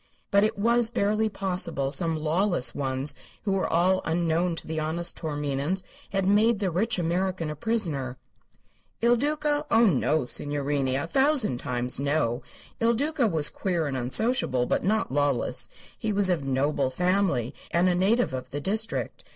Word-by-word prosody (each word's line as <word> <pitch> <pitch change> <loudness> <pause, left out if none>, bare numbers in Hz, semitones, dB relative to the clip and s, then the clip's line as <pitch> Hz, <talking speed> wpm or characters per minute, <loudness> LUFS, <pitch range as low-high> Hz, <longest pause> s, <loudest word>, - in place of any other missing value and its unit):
But 200 0 +5
it 215 - 0
was 235 +2 +3
barely 215 0 +1
possible 180 -8 -2
some 165 0 0
lawless 165 0 +1
ones 135 +1 -1 0.3
who 200 - -1
were 195 - 0
all 185 +3 +2
unknown 170 +1 0
to - - -5
the 160 0 -3
honest 165 +3 -2
Taorminians 150 +3 -2 0.3
had 195 -1 -1
made 215 +3 +4
the 195 -3 -1
rich 215 +6 0
American 175 -1 -1
a - - -5
prisoner. 150 - -1 0.9
Il 240 +1 +5
Duca? 295 +3 0
Oh, 230 +1 +5
no, 155 - +2
signorini! 140 0 -1
A 140 - -1
thousand 265 - +2
times, 125 -1 -1
no. 140 -3 0 0.4
Il 230 +1 +3
Duca 285 0 +1
was 160 -7 +1
queer 175 -4 -1
and 140 -2 -3
unsociable, 130 - +1
but - - 0
not 215 -3 0
lawless. 145 -2 +1 0.3
He 220 - -3
was 200 -2 +3
of 165 -5 0
noble 135 0 0
family 180 - 0 0.2
and 175 +2 +2
a 180 - +3
native 195 - +2
of 130 -1 -5
the 145 - -4
district. 215 +8 -2
175 Hz, 160 wpm, -26 LUFS, 145-210 Hz, 0.9 s, But